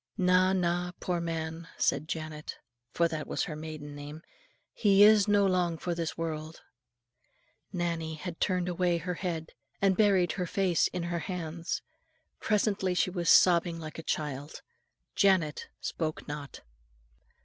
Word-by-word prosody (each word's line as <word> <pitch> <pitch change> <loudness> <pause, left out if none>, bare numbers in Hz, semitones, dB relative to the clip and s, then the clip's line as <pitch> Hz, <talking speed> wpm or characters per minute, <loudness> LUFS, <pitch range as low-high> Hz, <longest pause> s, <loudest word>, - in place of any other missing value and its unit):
"Na, 185 -1 +4
na, 175 -1 0
poor 175 -2 -1
man," 165 0 -4
said 155 - +1
Janet, 155 -2 -5 0.3
for 170 - +2
that 160 -2 -5
was - - -1
her 155 - -4
maiden 155 -1 -7
name, 145 +3 -9 0.5
"he 200 -2 +5
is 210 -1 +7
no 205 -1 +4
long 180 -3 +1
for 175 +2 -2
this 165 -1 -3
world." 160 -1 -5 1.1
Nannie 170 -3 -2
had 170 +2 -7
turned 180 -2 +1
away 175 -1 +1
her 180 +2 -3
head, 165 -3 -4 0.3
and 195 -1 +3
buried 195 -5 +4
her 180 -3 -3
face 185 -2 +2
in 180 - -4
her 170 0 -2
hands. 170 -2 -4 0.6
Presently 200 -3 +1
she 185 - +2
was 175 -2 -1
sobbing 170 -1 +5
like 155 0 -7
a - - -4
child. 150 -2 -4 0.5
Janet 185 -7 +2
spoke 155 -2 -3
not. 145 -1 -7
170 Hz, 145 wpm, -30 LUFS, 160-185 Hz, 1.1 s, is